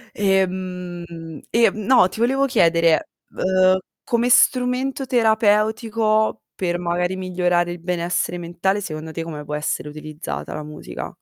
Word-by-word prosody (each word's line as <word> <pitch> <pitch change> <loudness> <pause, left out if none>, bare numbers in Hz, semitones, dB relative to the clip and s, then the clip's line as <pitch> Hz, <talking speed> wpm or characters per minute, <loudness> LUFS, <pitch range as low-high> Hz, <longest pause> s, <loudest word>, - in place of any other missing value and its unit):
E, 195 -2 +3
mhmm, 175 -3 -7
ehm, 230 -3 +3
no, 250 -6 +6
ti - - -9
volevo 270 +4 +2
chiedere, 170 -9 +3 0.2
uhm, 185 0 +3 0.3
come 235 +1 +1
strumento 255 +2 +3
terapeutico, 220 -1 +2
per 175 -2 -1
magari 175 +1 -1
migliorare 180 -1 0
il 175 - -7
benessere 175 0 -1
mentale, 175 +4 -1
secondo 160 -2 -6
te 165 - -5
come 150 -3 -7
può 150 - -7
essere 150 0 -2
utilizzata 155 +1 -6
la 155 - -5
musica? 150 - -8
185 Hz, 135 wpm, -21 LUFS, 170-220 Hz, 0.3 s, no